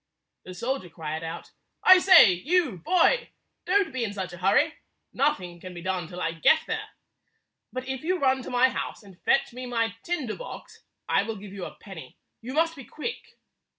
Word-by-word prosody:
The 185 - -9
soldier 235 -2 -3
cried 160 -1 -5
out, 165 +1 -7 0.3
"I 370 0 +9
say, 360 - +8
you 290 - 0
boy! 370 - +2 0.4
Don't 395 -1 +2
be 260 -2 -1
in 205 -3 -3
such 190 -3 -5
a - - -8
hurry. 270 - +3 0.4
Nothing 180 -11 0
can 180 +1 -9
be 170 - -7
done 185 -3 -2
till 180 +1 -9
I 165 - -1
get 240 - +4
there. - - -4 0.8
But 255 0 -5
if 265 -1 -4
you 365 +3 +1
run 265 -4 +2
to - - -8
my 250 +1 +4
house - - -5
and 190 -3 -16
fetch 275 -3 +2
me 250 +1 -7
my 230 -3 0
tinder 305 -9 -3
box, - - -10 0.3
I - - +3
will 220 +2 -4
give 200 -1 -10
you 195 -3 -6
a - - -9
penny. 165 -10 -11 0.2
You 255 +4 -6
must 330 +1 +2
be 275 - -10
quick." 310 - -7
235 Hz, 195 wpm, -26 LUFS, 185-300 Hz, 0.8 s, I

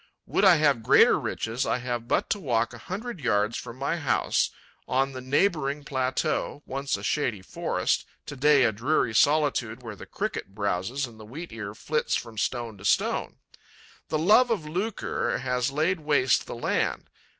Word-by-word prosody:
Would - - 0
I 190 -3 +8
have 145 -6 +3
greater - - +5
riches, 115 +3 -2
I - - 0
have 120 -2 -4
but - - +1
to 205 - +1
walk 120 - 0
a 120 - -10
hundred 205 - -6
yards 105 -4 +1
from 120 - -7
my 140 +5 -1
house, 145 - +1 0.4
on 135 +1 +1
the 130 -1 -7
neighbouring 145 +1 +1
plateau, 130 +1 -1
once 135 +1 -2
a - - -10
shady 120 -10 -1
forest, - - -1 0.2
to 145 - -7
day 145 0 +5
a 115 - +4
dreary 115 +2 0
solitude 130 -3 +2
where 115 -3 -7
the - - -11
Cricket 95 - -4
browses 105 +6 -1
and 115 -3 -13
the - - -10
Wheat 150 +9 -8
ear 105 -2 -6
flits 155 +6 -1
from 115 -2 -5
stone 115 -4 -2
to - - -12
stone. 100 - +1 0.7
The 155 - 0
love 210 +10 +5
of 215 -9 -1
lucre 190 +7 -2
has 125 0 -1
laid 160 +6 0
waste 145 -4 +2
the - - -6
land. 120 - -1
130 Hz, 175 wpm, -26 LUFS, 115-150 Hz, 0.7 s, I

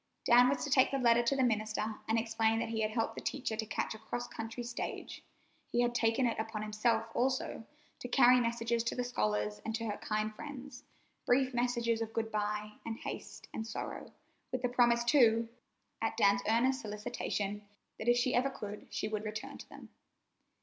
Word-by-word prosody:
Dan 245 +1 +7
was 275 - 0
to 285 - -3
take 260 -1 +5
the 275 - -1
letter 240 -2 +5
to 240 +4 +1
the 265 - +2
minister, 215 -2 0
and 225 - +2
explain 225 0 +1
that 225 - -1
he 225 -1 -1
had 215 - +1
helped 225 +1 -1
the - - -7
teacher 255 -5 -2
to 220 0 -2
catch 220 - -2
a 220 - -10
cross 240 +2 -4
country 230 +2 -6
stage. 235 0 -5 0.4
He 240 - +1
had 240 0 +1
taken 235 +2 +2
it 230 -2 0
upon 220 -1 -3
himself, 220 +1 +1
also, 255 -3 -1 0.3
to - - -5
carry 250 0 +6
messages 235 0 0
to - - -1
the 250 - -1
scholars 105 - -1
and 225 - -2
to 230 0 -3
her 210 -2 -2
kind 215 0 -2
friends—brief 265 -1 -3
messages 240 -1 +1
of 225 0 -3
good 220 0 -2
by, 210 0 -2
and 225 -1 -4
haste, - - -7
and 220 - -4
sorrow; 220 - -6 0.4
with 255 -1 -2
the 250 - +2
promise, 240 -1 +4
too, 235 -3 +4 0.5
at - - -1
Dan's 200 0 +4
earnest 260 +4 +3
solicitation, 205 -1 -3 0.4
that 220 - -5
if 240 - +5
she 250 +1 +2
ever 255 +3 +3
could 210 -5 -7
she - - -2
would 215 -1 -3
return 215 0 -6
to - - -11
them. - - -12
230 Hz, 195 wpm, -33 LUFS, 215-245 Hz, 0.5 s, Dan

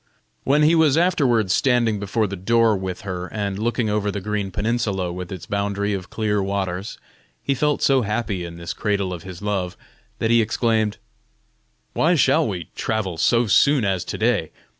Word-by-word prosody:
When 145 +3 +3
he 155 +2 +5
was 160 -3 +4
afterward 135 - +2
standing 120 -2 +2
before 105 +2 0
the 100 -1 -4
door 115 +3 +3
with 95 -2 -4
her, 90 -2 -5
and 100 -2 -3
looking 115 +1 0
over 105 -1 0
the 100 - -3
green 105 0 -2
peninsula 100 -3 -1
with 90 0 -7
its 95 -4 -7
boundary 100 0 -1
of 95 -2 -5
clear 105 -2 0
waters, 95 0 -3 0.5
he 140 - +1
felt 150 +2 0
so 135 -2 +4
happy 105 -4 -2
in 85 -1 -8
this 85 0 -5
cradle 100 -3 -1
of 85 - -7
his 90 +2 -10
love, 95 -4 -2 0.4
that 115 - 0
he 115 0 +5
exclaimed: 110 -1 0 1.0
"Why 170 +3 +3
shall 150 +1 +3
we 90 -6 -5
travel 100 -6 -2
so 115 +7 +3
soon 135 +3 +4
as 95 -3 0
to - - -4
day? - - +1
105 Hz, 180 wpm, -22 LUFS, 95-115 Hz, 1.0 s, he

